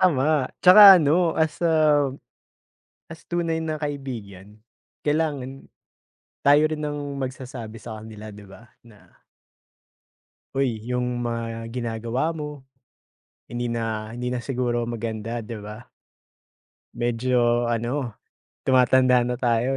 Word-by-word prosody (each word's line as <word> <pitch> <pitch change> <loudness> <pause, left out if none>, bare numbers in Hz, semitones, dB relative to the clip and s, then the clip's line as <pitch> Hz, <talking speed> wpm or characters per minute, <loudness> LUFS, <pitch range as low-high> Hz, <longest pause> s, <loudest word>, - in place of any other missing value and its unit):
Tama 150 -5 +2
tsaka 195 +1 +10
ano 165 +2 +2
as, 160 -1 0
ah, 155 -4 +3 1.0
as, 165 0 -11
tunay 165 -2 -1
na 155 -1 -3
kaibigan, 110 -9 -6 0.5
kailangan 145 -3 -2 0.8
tayo 145 +2 +6
rin 155 - -3
ang 145 -1 -4
magsasabi 130 -4 -6
sa 110 0 -8
kanila, 110 0 -10
'di 105 0 -12
ba, 110 +4 -15 0.2
na 105 -2 -20 1.4
"Uy 125 -5 -1
yung 125 0 -2
mga 115 -1 -4
ginagawa 120 +5 -2
mo, 150 -3 -7 0.8
hindi 120 0 -3
na 110 -2 -3
hindi 125 +1 -4
na 125 - -3
siguro 120 -3 -1
maganda 115 0 -4
'di 115 +1 -6
ba? 105 +3 -9 1.1
Medyo, 120 0 +1
ano, 120 +2 -2 0.5
tumatanda 130 -1 +4
na 125 0 -2
tayo 120 +1 +1
125 Hz, 110 wpm, -24 LUFS, 115-145 Hz, 1.4 s, tsaka